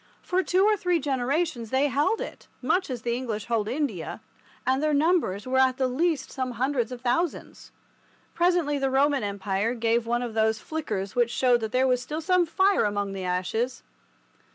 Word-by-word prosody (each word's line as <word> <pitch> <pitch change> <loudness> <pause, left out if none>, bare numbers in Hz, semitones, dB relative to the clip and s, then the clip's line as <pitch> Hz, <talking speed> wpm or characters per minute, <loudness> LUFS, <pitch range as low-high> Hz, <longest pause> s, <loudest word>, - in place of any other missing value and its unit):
For 365 +1 +1
two 370 +1 +2
or 430 0 +4
three 360 -3 +1
generations 270 -2 -1
they 265 +3 +2
held 290 - +1
it, - - -8
much 375 -1 0
as 245 -3 -5
the 235 0 0
English 225 -5 -4
hold 225 -3 0
India, 235 - -3 0.5
and 260 +1 +2
their 305 -1 +2
numbers 295 - +1
were 260 +1 +1
at 260 -1 +3
the 260 - +1
least 285 +1 0
some 255 -2 -3
hundreds 255 0 -1
of 250 -1 -7
thousands. 270 +7 -2 0.6
Presently 340 -5 +2
the 270 0 +1
Roman 275 +1 +2
Empire 200 +2 -1
gave 230 0 +1
one 240 +1 0
of 235 -2 -5
those 220 0 +2
flickers 215 -11 -4
which 240 -1 +3
showed 245 0 +3
that 220 -1 -3
there 255 +1 +2
was 250 -1 +2
still 300 +5 -4
some 360 +1 +2
fire 385 +4 +3
among 205 -1 -1
the 190 -1 -5
ashes. 185 +8 -2
255 Hz, 185 wpm, -26 LUFS, 230-305 Hz, 0.6 s, or